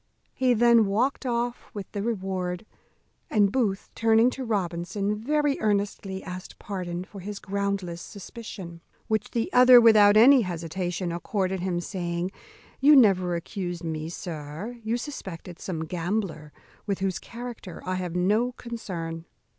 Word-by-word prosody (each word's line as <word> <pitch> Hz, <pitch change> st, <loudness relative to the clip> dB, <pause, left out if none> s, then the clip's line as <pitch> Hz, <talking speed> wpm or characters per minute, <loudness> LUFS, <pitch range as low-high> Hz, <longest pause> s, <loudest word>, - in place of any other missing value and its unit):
He 255 Hz, -2 st, +2 dB
then 235 Hz, -1 st, +5 dB
walked 250 Hz, +7 st, 0 dB
off 240 Hz, 0 st, -2 dB
with 200 Hz, -3 st, -6 dB
the 200 Hz, -, -3 dB
reward; 190 Hz, -4 st, -2 dB, 0.6 s
and 205 Hz, -2 st, +3 dB
Booth, 205 Hz, -6 st, -1 dB
turning 225 Hz, +2 st, +4 dB
to 265 Hz, -, -5 dB
Robinson, 200 Hz, -1 st, -1 dB
very 290 Hz, +6 st, 0 dB
earnestly 200 Hz, -2 st, -1 dB
asked 180 Hz, 0 st, -8 dB
pardon 180 Hz, -3 st, -4 dB
for 195 Hz, +1 st, -11 dB
his 205 Hz, +2 st, -6 dB
groundless 200 Hz, -4 st, -2 dB
suspicion; 195 Hz, -5 st, -9 dB, 0.3 s
which 220 Hz, -2 st, 0 dB
the 230 Hz, -1 st, -2 dB
other, 250 Hz, 0 st, +9 dB
without 215 Hz, -3 st, +7 dB
any 255 Hz, +4 st, +8 dB
hesitation, 175 Hz, -1 st, -3 dB
accorded 190 Hz, +2 st, -1 dB
him, 180 Hz, -1 st, -1 dB
saying, 175 Hz, 0 st, -3 dB, 0.5 s
"You 290 Hz, +2 st, +7 dB
never 185 Hz, -8 st, +5 dB
accused 175 Hz, 0 st, -4 dB
me, 160 Hz, -1 st, -3 dB
sir; 170 Hz, +7 st, -6 dB
you 225 Hz, +2 st, 0 dB
suspected 190 Hz, -, -7 dB
some 160 Hz, -4 st, -4 dB
gambler, 175 Hz, -2 st, -3 dB, 0.4 s
with 200 Hz, -2 st, 0 dB
whose 190 Hz, -2 st, -1 dB
character 235 Hz, -6 st, -8 dB
I 185 Hz, -, -1 dB
have 180 Hz, -2 st, -3 dB
no 210 Hz, +7 st, +2 dB
concern. 175 Hz, -10 st, -6 dB
195 Hz, 140 wpm, -26 LUFS, 175-230 Hz, 0.6 s, other